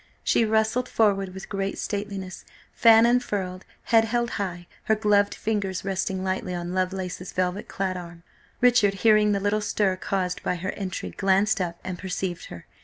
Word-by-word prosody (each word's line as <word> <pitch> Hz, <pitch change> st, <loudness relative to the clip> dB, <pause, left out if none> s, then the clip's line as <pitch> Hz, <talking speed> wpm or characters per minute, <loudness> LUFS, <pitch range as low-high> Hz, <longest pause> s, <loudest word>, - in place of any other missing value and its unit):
She 230 Hz, -, +3 dB
rustled 220 Hz, +3 st, +1 dB
forward 195 Hz, -3 st, +2 dB
with 190 Hz, +1 st, -9 dB
great 195 Hz, 0 st, -3 dB
stateliness, 200 Hz, -2 st, -5 dB, 0.3 s
fan 225 Hz, 0 st, +6 dB
unfurled, 205 Hz, -7 st, 0 dB, 0.2 s
head 225 Hz, -1 st, +4 dB
held 240 Hz, +1 st, -1 dB
high, 175 Hz, -3 st, -4 dB, 0.2 s
her 220 Hz, -, +3 dB
gloved 205 Hz, -1 st, +2 dB
fingers 200 Hz, -4 st, -2 dB
resting 190 Hz, -1 st, -2 dB
lightly 185 Hz, -1 st, -2 dB
on 175 Hz, 0 st, -4 dB
Lovelace's 185 Hz, -1 st, -3 dB
velvet 185 Hz, +2 st, -1 dB
clad 190 Hz, -1 st, -2 dB
arm. 170 Hz, -1 st, -10 dB, 0.4 s
Richard, 240 Hz, -5 st, +4 dB
hearing 215 Hz, -1 st, +5 dB
the 200 Hz, -, +1 dB
little 205 Hz, +2 st, 0 dB
stir 205 Hz, -2 st, +1 dB
caused 185 Hz, -2 st, -2 dB
by -, -, -1 dB
her 185 Hz, +2 st, -3 dB
entry, 190 Hz, -3 st, -5 dB
glanced 195 Hz, +1 st, +2 dB
up, 170 Hz, -1 st, -3 dB
and 185 Hz, -1 st, -5 dB
perceived 185 Hz, -2 st, -4 dB
her. 85 Hz, -, -10 dB
195 Hz, 165 wpm, -25 LUFS, 185-215 Hz, 0.4 s, fan